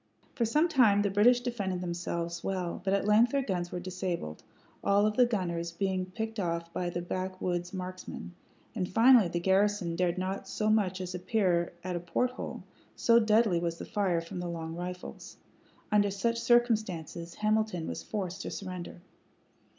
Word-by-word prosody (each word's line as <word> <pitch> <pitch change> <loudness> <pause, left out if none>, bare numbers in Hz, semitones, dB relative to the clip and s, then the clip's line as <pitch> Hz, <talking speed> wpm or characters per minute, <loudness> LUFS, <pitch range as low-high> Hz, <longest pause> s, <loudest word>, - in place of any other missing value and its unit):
For 235 - 0
some 300 +9 +3
time 220 -10 +4
the 200 - 0
British 240 +5 +5
defended 205 -7 -2
themselves 170 -1 -3
well; 180 -3 -2
but 195 - 0
at 200 - -1
length 225 +4 +5
their 275 -1 +2
guns 180 -6 -2
were 180 - -3
disabled, 180 - -4 0.4
all 200 +1 +4
of 215 0 +1
the 250 0 +5
gunners 170 -6 -2
being 185 +1 -1
picked 220 +3 -4
off 170 -2 -2
by 180 -1 -1
the 175 0 -4
backwoods 185 -1 -3
marksmen, 185 -1 -6 0.4
and 185 -6 -2
finally 230 0 +6
the 175 0 -2
garrison 190 -1 +2
dared 180 0 +1
not 190 +1 -3
so 215 +2 0
much 190 -4 +1
as 180 0 -5
appear 180 -2 +1
at 180 -1 -3
a - - -1
port 175 +9 0
hole, 255 - -6 0.3
so 235 0 +5
deadly 215 -4 +3
was 170 -1 -2
the - - -7
fire 185 -5 0
from 165 +2 -7
the 175 0 -3
long 165 -1 -5
rifles. 180 +1 -7 0.5
Under 205 -1 +4
such 230 +4 -1
circumstances 210 -9 +1
Hamilton 215 -5 0
was - - -4
forced 190 -3 -4
to - - -4
surrender. 185 -2 -6
185 Hz, 175 wpm, -30 LUFS, 175-215 Hz, 0.5 s, finally